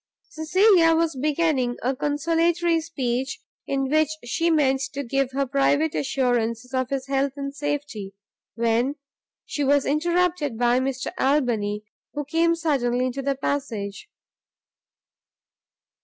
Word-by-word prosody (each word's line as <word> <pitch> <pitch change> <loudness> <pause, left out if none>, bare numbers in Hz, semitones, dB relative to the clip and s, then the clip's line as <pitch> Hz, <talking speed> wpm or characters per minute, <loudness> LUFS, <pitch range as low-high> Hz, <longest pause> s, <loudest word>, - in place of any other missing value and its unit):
Cecilia 335 +1 +4
was 325 -2 +1
beginning 280 -3 0
a 260 +2 0
consolatory 330 +4 +1
speech, 265 -4 -3 0.3
in 270 -1 0
which 310 +1 +2 0.2
she 330 +8 0
meant 270 -4 +2
to 280 - -2
give 270 +1 0
her 275 +1 0
private 285 +3 +2
assurances 245 -2 -1
of 260 -1 0
his 270 -1 -2
health 275 0 0
and 275 -1 -5
safety, 285 -9 -4 0.4
when 235 +4 +1 0.5
she 290 - -3
was 280 0 +3
interrupted 330 -3 0
by 245 +1 +3
Mr 260 0 -2
Albany, 235 -7 +1 0.3
who 295 0 -3
came 335 +3 +2
suddenly 255 -7 0
into 255 +2 -3
the 275 0 0
passage. 255 - -3
275 Hz, 125 wpm, -24 LUFS, 255-310 Hz, 0.5 s, Cecilia